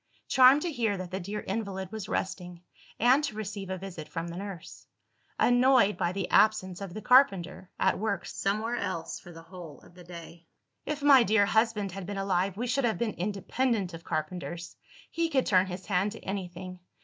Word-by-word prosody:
Charmed 265 +3 +6
to 350 - -1
hear 225 -7 0
that 185 -1 -7
the 190 - -3
dear 200 +3 -5
invalid 195 -2 -4
was 215 -2 -6
resting, 180 -2 -4 0.4
and 255 +6 +4
to 275 -7 -3
receive 205 -2 -5
a 190 - -3
visit 180 -4 -8
from 165 0 -5
the 170 - -7
nurse: 195 -2 -8 0.5
annoyed 245 -4 +4
by 175 - -1
the 190 -1 -3
absence 205 -4 +3
of 195 -3 -7
the 215 - -6
carpenter, 195 -8 +3
at - - +2
work 205 -3 -2
somewhere 215 +4 -2
else 170 -3 -4
for 175 - -13
the 165 -1 -12
whole 165 -5 -11
of - - -18
the 180 0 -14
day. 170 -1 -11 0.4
"If 295 -1 -3
my 280 -3 +8
dear 215 -2 +4
husband 220 -2 +1
had 195 0 -7
been 205 0 -4
alive, 195 0 0
we 240 - -2
should 275 +3 0
have 230 -2 +1
been 230 -3 -1
independent 205 +1 -1
of 165 0 -9
carpenters; 170 +2 -4 0.4
he 335 0 0
could 265 -5 +1
turn 185 -1 +3
his 180 0 -7
hand 200 +1 0
to - - -10
anything. 185 -1 -6
195 Hz, 195 wpm, -29 LUFS, 180-225 Hz, 0.5 s, my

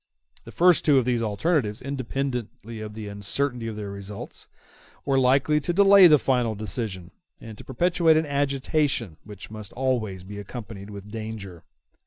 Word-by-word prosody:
The - - -10
first 180 0 +4
two 145 -3 +4
of 130 - +3
these 120 -2 +1
alternatives, 110 - 0
independently 125 -4 -4
of 105 -1 -7
the 110 -1 -6
uncertainty 115 +5 -3
of 110 - -5
their 105 -2 -6
results, 100 +1 -8 0.6
were 135 -1 +2
likely 135 +4 +3
to 175 +4 -2
delay 200 0 +8
the 155 -2 +7
final 125 -5 0
decision, 100 -3 -5 0.3
and 110 -1 -10
to - - -9
perpetuate 165 +3 +2
an 160 - +1
agitation 140 - -1
which 105 0 -11
must 110 -2 -8
always 115 -8 -1
be 100 +2 -8
accompanied 105 -1 -8
with 100 0 -10
danger. 110 -6 -7
115 Hz, 160 wpm, -25 LUFS, 105-140 Hz, 0.6 s, delay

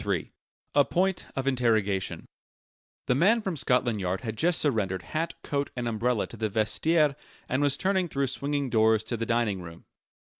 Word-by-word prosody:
III 100 -5 -2 0.4
A 145 - +6
POINT 185 +4 0
OF 135 - -2
INTERROGATION 110 -7 +1 0.8
The - - +2
man 195 - +4
from 190 -4 -2
Scotland 125 -6 +1
Yard 95 +1 -2
had 115 -3 -4
just 170 +8 +2
surrendered 100 - 0
hat, 165 +2 -3
coat, 140 -1 -2
and 120 -1 -3
umbrella 115 0 0
to 115 - -12
the 110 0 -1
vestiaire 140 +9 +2 0.3
and 130 - 0
was 140 -1 +2
turning 190 -1 +1
through 140 -3 -1
swinging 140 +1 -2
doors 110 -1 +3
to 120 - -3
the 115 0 -3
dining 115 -5 0
room. 85 -1 -11
125 Hz, 175 wpm, -27 LUFS, 110-145 Hz, 0.8 s, A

